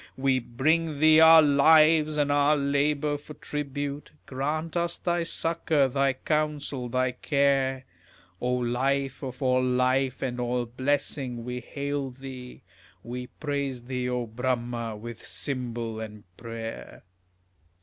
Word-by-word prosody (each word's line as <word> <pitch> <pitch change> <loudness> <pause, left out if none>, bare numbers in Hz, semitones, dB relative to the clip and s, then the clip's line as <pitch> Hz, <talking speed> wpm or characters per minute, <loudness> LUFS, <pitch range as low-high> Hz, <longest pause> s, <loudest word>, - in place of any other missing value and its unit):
We 130 -1 +2
bring 155 +6 0
thee 155 +1 +6
our 160 0 +9
lives 155 +1 +5
and 145 -1 +2
our 145 +1 +3
labours 145 +1 0
for 150 0 -11
tribute, 145 0 -4 0.2
Grant 155 +5 -3
us 170 0 -1
thy 175 -1 0
succour, 165 -3 +1
thy 135 +1 +1
counsel, 145 -3 -2
thy 130 +1 +1
care. 135 0 +1 0.6
O 125 - 0
Life 130 +2 0
of 130 -1 -6
all 130 0 +3
life 130 +1 +1
and 125 -2 -3
all 120 0 -1
blessing, 130 -1 -2
we 125 0 -4
hail 140 +2 -4
thee, 130 -1 -10 0.4
We 125 +2 -6
praise 140 -4 -4
thee, 125 0 -3
O 125 -1 -1
Bramha, 120 -1 -3
with 120 +1 -8
cymbal 120 -5 -4
and 105 -2 -8
prayer. 115 0 -8
135 Hz, 130 wpm, -27 LUFS, 125-145 Hz, 0.6 s, our